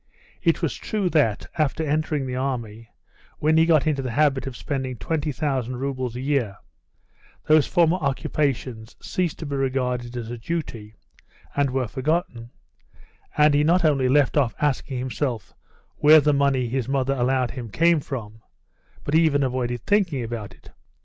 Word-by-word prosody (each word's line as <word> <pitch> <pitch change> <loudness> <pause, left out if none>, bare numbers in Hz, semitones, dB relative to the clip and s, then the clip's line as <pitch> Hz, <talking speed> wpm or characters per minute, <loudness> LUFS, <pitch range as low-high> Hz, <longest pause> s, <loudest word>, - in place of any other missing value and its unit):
It - - +1
is - - +1
true 200 -5 -2
that 125 -10 +2
after 155 +1 +1
entering 150 -1 0
the 125 -1 -4
army, 115 -4 -4 0.5
when 155 +1 +2
he 160 +1 +5
got 155 -4 +4
into 150 -3 0
the 130 - -3
habit 135 +1 +1
of 130 - -6
spending 130 -3 -3
20,000 140 -1 -2
roubles 130 -2 -3
a - - -4
year, 130 -8 -1 0.9
those 155 -1 +4
former 175 0 +3
occupations 135 -6 -2
ceased 180 -4 -2
to 160 - -7
be 145 -1 -3
regarded 125 -2 -1
as 115 -1 -5
a 120 - -6
duty, 115 -7 -5 0.6
and 140 -1 +2
were 130 -1 -1
forgotten, 130 -2 -2 0.9
and 150 0 +5
he 145 +1 +3
not 170 +3 +3
only 135 -4 +3
left 145 +1 +3
off 130 -6 +2
asking 135 -2 -1
himself 125 - -3 0.4
where 155 +1 +7
the 150 0 +2
money 140 -3 +2
his 130 +1 -2
mother 135 0 +1
allowed 130 -1 0
him 120 -4 -7
came 165 +8 +3
from, 110 -6 -7 0.6
but 145 - -4
even 155 -3 +4
avoided 125 -2 -2
thinking 180 - +1
about 115 -2 -6
it. - - -18
135 Hz, 160 wpm, -24 LUFS, 125-150 Hz, 0.9 s, where